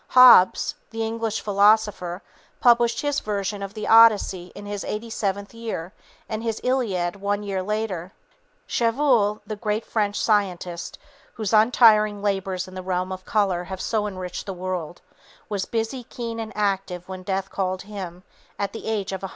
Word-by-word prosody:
Hobbes, 250 Hz, -7 st, +7 dB, 0.2 s
the 225 Hz, 0 st, -3 dB
English 225 Hz, -1 st, -2 dB
philosopher, 205 Hz, -3 st, +2 dB, 0.4 s
published 235 Hz, -1 st, +4 dB
his 290 Hz, -1 st, 0 dB
version 200 Hz, -1 st, -3 dB
of 200 Hz, +1 st, -6 dB
the 215 Hz, -, -4 dB
Odyssey 210 Hz, -5 st, +5 dB
in 205 Hz, -, -9 dB
his 205 Hz, -1 st, -4 dB
eighty 225 Hz, +2 st, -5 dB
seventh 200 Hz, -1 st, -2 dB
year, 220 Hz, -6 st, -5 dB, 0.3 s
and 220 Hz, 0 st, -4 dB
his 225 Hz, -1 st, -2 dB
Iliad 200 Hz, -9 st, 0 dB
one 200 Hz, +1 st, -1 dB
year 195 Hz, -2 st, -2 dB
later. 195 Hz, -3 st, -3 dB, 0.6 s
Chevreul, 230 Hz, -3 st, +2 dB
the 215 Hz, 0 st, -5 dB
great 210 Hz, +1 st, -2 dB
French 205 Hz, -2 st, -1 dB
scientist, 180 Hz, -5 st, -1 dB, 0.4 s
whose 215 Hz, -3 st, -3 dB
untiring 215 Hz, -2 st, +5 dB
labors 195 Hz, -2 st, -1 dB
in 185 Hz, -, -12 dB
the 185 Hz, -, -6 dB
realm 185 Hz, 0 st, -2 dB
of 185 Hz, 0 st, -7 dB
color 190 Hz, -5 st, +1 dB
have 190 Hz, 0 st, -6 dB
so 215 Hz, 0 st, -1 dB
enriched 185 Hz, -1 st, -6 dB
the 195 Hz, -, -3 dB
world, 180 Hz, -2 st, -4 dB, 0.5 s
was 200 Hz, -2 st, -2 dB
busy, 230 Hz, +3 st, -3 dB
keen 230 Hz, -1 st, -6 dB
and 220 Hz, -1 st, -5 dB
active 195 Hz, -3 st, -1 dB
when 185 Hz, -1 st, -7 dB
Death 190 Hz, +1 st, -3 dB
called 185 Hz, -1 st, -2 dB
him, 190 Hz, -3 st, -8 dB, 0.3 s
at 200 Hz, -1 st, -2 dB
the 225 Hz, -, -7 dB
age 210 Hz, -4 st, -1 dB
of 190 Hz, -1 st, -4 dB
103. 195 Hz, -, -5 dB
205 Hz, 165 wpm, -24 LUFS, 185-220 Hz, 0.6 s, Hobbes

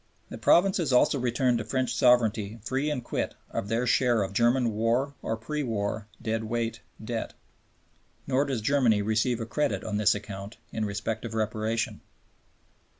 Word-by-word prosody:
The -, -, -7 dB
provinces 175 Hz, -5 st, +4 dB
also 125 Hz, +2 st, +4 dB
return 125 Hz, 0 st, +1 dB
to -, -, -3 dB
French 130 Hz, +1 st, -1 dB
sovereignty 115 Hz, -3 st, +3 dB
free 135 Hz, +5 st, -1 dB
and 135 Hz, -5 st, -2 dB
quit -, -, -3 dB, 0.2 s
of -, -, -3 dB
their 115 Hz, +3 st, 0 dB
share 120 Hz, -3 st, +3 dB
of 95 Hz, -, -5 dB
German 120 Hz, +2 st, +3 dB
war 115 Hz, +6 st, 0 dB
or 115 Hz, -, -2 dB
pre 150 Hz, +7 st, -3 dB
war 110 Hz, -4 st, -2 dB
dead 110 Hz, -1 st, -2 dB
weight 115 Hz, 0 st, -2 dB, 0.2 s
debt; -, -, -4 dB, 0.9 s
nor 135 Hz, +1 st, +2 dB
does 135 Hz, -5 st, -2 dB
Germany 115 Hz, -4 st, +3 dB
receive 110 Hz, +3 st, +1 dB
a 115 Hz, -, -3 dB
credit 150 Hz, +6 st, -1 dB
on 105 Hz, -1 st, -2 dB
this 105 Hz, -1 st, +4 dB
account 100 Hz, +1 st, -7 dB
in 110 Hz, -, -2 dB
respect 105 Hz, +2 st, -3 dB
of 115 Hz, -2 st, -5 dB
Reparation. 110 Hz, +1 st, -1 dB
115 Hz, 160 wpm, -27 LUFS, 110-125 Hz, 0.9 s, provinces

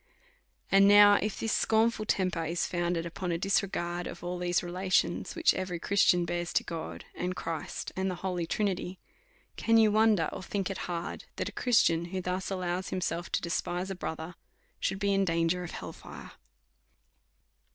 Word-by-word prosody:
And 195 Hz, 0 st, +7 dB
now 205 Hz, 0 st, +8 dB
if 210 Hz, 0 st, -2 dB
this 225 Hz, -, -1 dB
scornful 220 Hz, 0 st, +2 dB
temper 180 Hz, -3 st, 0 dB
is 170 Hz, +2 st, -1 dB
founded 175 Hz, -1 st, -1 dB
upon 175 Hz, +1 st, -4 dB
a 165 Hz, -, 0 dB
dis 195 Hz, +4 st, +2 dB
regard 175 Hz, -3 st, -3 dB
of -, -, -8 dB
all 175 Hz, 0 st, -3 dB
tliese 175 Hz, 0 st, +1 dB
relations, 180 Hz, -1 st, 0 dB
which -, -, +4 dB
every 185 Hz, -2 st, -3 dB
Christian 180 Hz, -1 st, +3 dB
bears 175 Hz, 0 st, -3 dB
to -, -, +2 dB
God, 165 Hz, -1 st, -6 dB
and 180 Hz, +1 st, -3 dB
Christ, 165 Hz, -4 st, -5 dB
and 190 Hz, 0 st, -1 dB
the 180 Hz, -, -3 dB
Holy 175 Hz, -2 st, -3 dB
Trinity, 190 Hz, -2 st, -1 dB, 0.6 s
can 225 Hz, 0 st, +3 dB
you 220 Hz, -1 st, +5 dB
wonder, 215 Hz, -6 st, +4 dB
or -, -, -6 dB
think 195 Hz, 0 st, -3 dB
it 190 Hz, -, -5 dB
hard, 170 Hz, -1 st, -4 dB
that -, -, -2 dB
a -, -, -11 dB
Christian 175 Hz, -9 st, +2 dB
who 185 Hz, +2 st, -4 dB
thus 180 Hz, +1 st, -3 dB
allows 185 Hz, -1 st, -2 dB
himself 175 Hz, -2 st, -3 dB
to -, -, 0 dB
despise 175 Hz, +2 st, -2 dB
a -, -, -3 dB
brother 160 Hz, -1 st, -5 dB, 0.5 s
should 190 Hz, -, -1 dB
be 200 Hz, 0 st, 0 dB
iii 195 Hz, 0 st, +3 dB
danger 165 Hz, 0 st, +1 dB
of 175 Hz, -, -6 dB
hell -, -, -7 dB
fire? -, -, -11 dB
180 Hz, 180 wpm, -30 LUFS, 175-195 Hz, 0.6 s, now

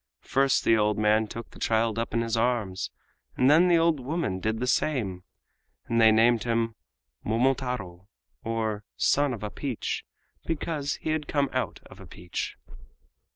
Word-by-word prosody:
First 135 Hz, 0 st, +2 dB
the 115 Hz, -, +4 dB
old 105 Hz, -1 st, +2 dB
man 105 Hz, +1 st, +3 dB
took 115 Hz, +1 st, -8 dB
the -, -, -14 dB
child 115 Hz, 0 st, +1 dB
up 115 Hz, -, -2 dB
in 115 Hz, -, +1 dB
his 115 Hz, 0 st, -1 dB
arms, 115 Hz, -5 st, 0 dB, 0.5 s
and 130 Hz, +2 st, +5 dB
then 165 Hz, +4 st, +6 dB
the 175 Hz, -1 st, +5 dB
old 165 Hz, -2 st, +3 dB
woman 130 Hz, -, -2 dB
did 110 Hz, +3 st, -1 dB
the 125 Hz, -, -1 dB
same; 120 Hz, -9 st, 0 dB, 0.6 s
and 115 Hz, 0 st, +1 dB
they 110 Hz, 0 st, +7 dB
named 115 Hz, +1 st, +4 dB
him 115 Hz, -1 st, 0 dB, 0.5 s
MOMOTARO, 115 Hz, -6 st, -1 dB, 0.4 s
OR 110 Hz, -2 st, -2 dB
SON 145 Hz, -1 st, +2 dB
OF 115 Hz, -4 st, -5 dB
A 105 Hz, -, -4 dB
PEACH, 135 Hz, -6 st, -3 dB, 0.4 s
because 150 Hz, -3 st, -2 dB
he 155 Hz, -, 0 dB
had 155 Hz, -1 st, -2 dB
come 140 Hz, -2 st, 0 dB
out -, -, -2 dB
of -, -, -14 dB
a -, -, -12 dB
peach. 90 Hz, -1 st, -5 dB
115 Hz, 165 wpm, -27 LUFS, 110-135 Hz, 0.6 s, they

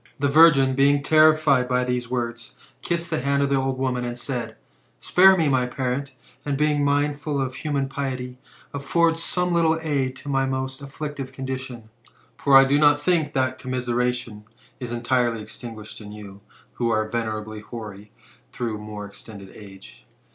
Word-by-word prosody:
The 140 Hz, 0 st, +1 dB
virgin 140 Hz, -3 st, +6 dB
being 140 Hz, +1 st, +3 dB
terrified 155 Hz, -4 st, +4 dB
by 125 Hz, 0 st, +2 dB
these 125 Hz, -1 st, -2 dB
words, 120 Hz, -2 st, -4 dB, 0.3 s
kissed 170 Hz, +3 st, -2 dB
the -, -, 0 dB
hand 140 Hz, +1 st, +1 dB
of 140 Hz, -, 0 dB
the 140 Hz, -, +2 dB
old 135 Hz, -1 st, -1 dB
woman, 130 Hz, -2 st, -1 dB
and 120 Hz, 0 st, -4 dB
said, 120 Hz, -4 st, -4 dB, 0.2 s
" -, -, -39 dB
Spare 190 Hz, +1 st, +5 dB
mie, 160 Hz, -3 st, +2 dB
my 130 Hz, -3 st, +2 dB
parent, 130 Hz, +2 st, -3 dB, 0.3 s
and, 145 Hz, -2 st, -2 dB
being 150 Hz, 0 st, +1 dB
mindful 145 Hz, 0 st, 0 dB
of 130 Hz, -1 st, -2 dB
human 140 Hz, -1 st, -2 dB
piety, 130 Hz, -2 st, -5 dB, 0.3 s
afford 165 Hz, +4 st, +1 dB
some 180 Hz, +1 st, 0 dB
little 165 Hz, -1 st, +2 dB
aid 135 Hz, -4 st, -1 dB
to 140 Hz, -, -13 dB
my 135 Hz, -1 st, +1 dB
most 130 Hz, 0 st, -3 dB
afflictive 140 Hz, -1 st, -6 dB
condition. 130 Hz, -4 st, -6 dB, 0.5 s
For 140 Hz, -1 st, +5 dB
I 135 Hz, -, +8 dB
do 140 Hz, +2 st, +2 dB
not 145 Hz, -1 st, +5 dB
think 155 Hz, -1 st, +1 dB
that 130 Hz, -1 st, 0 dB
commiseration 125 Hz, -3 st, -2 dB, 0.3 s
is 125 Hz, -2 st, -6 dB
entirely 120 Hz, -1 st, 0 dB
extinguished 110 Hz, 0 st, -9 dB
in 105 Hz, -1 st, -10 dB
you, 100 Hz, -2 st, -11 dB, 0.4 s
who 120 Hz, -, +2 dB
are 110 Hz, -1 st, +1 dB
venerably 110 Hz, -1 st, -4 dB
hoary 105 Hz, -2 st, -9 dB, 0.4 s
through 115 Hz, -3 st, -4 dB
more 105 Hz, -1 st, -7 dB
extended 100 Hz, -1 st, -12 dB
age. 100 Hz, -2 st, -14 dB
130 Hz, 165 wpm, -23 LUFS, 120-145 Hz, 0.5 s, I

